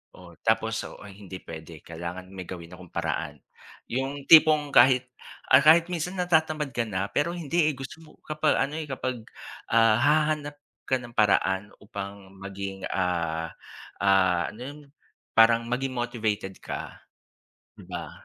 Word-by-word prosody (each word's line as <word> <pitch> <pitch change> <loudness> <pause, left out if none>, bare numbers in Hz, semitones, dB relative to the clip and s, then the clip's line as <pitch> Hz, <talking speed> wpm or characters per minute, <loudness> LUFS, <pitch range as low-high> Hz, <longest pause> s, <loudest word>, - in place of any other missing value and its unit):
o 85 -2 -14
tapos 110 0 +1 0.3
hindi 95 -1 -9
puwede 80 0 -10
kailangan 85 +2 -7
may 95 -1 -7
gawin 85 -1 -8
akong 90 -1 -14
paraan - - -3 0.5
yung 135 +3 -3
tipong 155 -2 +7
kahit, 125 0 +5 0.4
ah, 130 - +8
kahit 160 +3 +7
minsan 180 +2 -3
natatamad 160 -4 +1
ka 120 - 0
na 100 -1 -2
pero 155 +4 +1
hindi 165 -1 +1
eh, - - -7
gusto 135 +4 -8
mo - - -17 0.2
kapag 155 0 +1
ano 140 +3 0
eh, 155 - -4
kapag 130 -3 -4 0.5
ah, 115 -1 +5
hahanap 150 +1 +1 0.3
ka 130 - +3
ng 120 -1 -11
paraan 100 -2 +2
upang 100 -1 -8
maging, 100 0 -6
ah, 85 -3 -1 0.5
ah, 95 -3 +3
ano 110 - -14
yun 140 +4 -7 0.6
parang 115 +1 +6
maging 130 +2 -1
motivated 110 -5 -2
ka, - - -7 0.8
di - - -13
ba? - - -7
115 Hz, 145 wpm, -26 LUFS, 95-145 Hz, 0.8 s, ah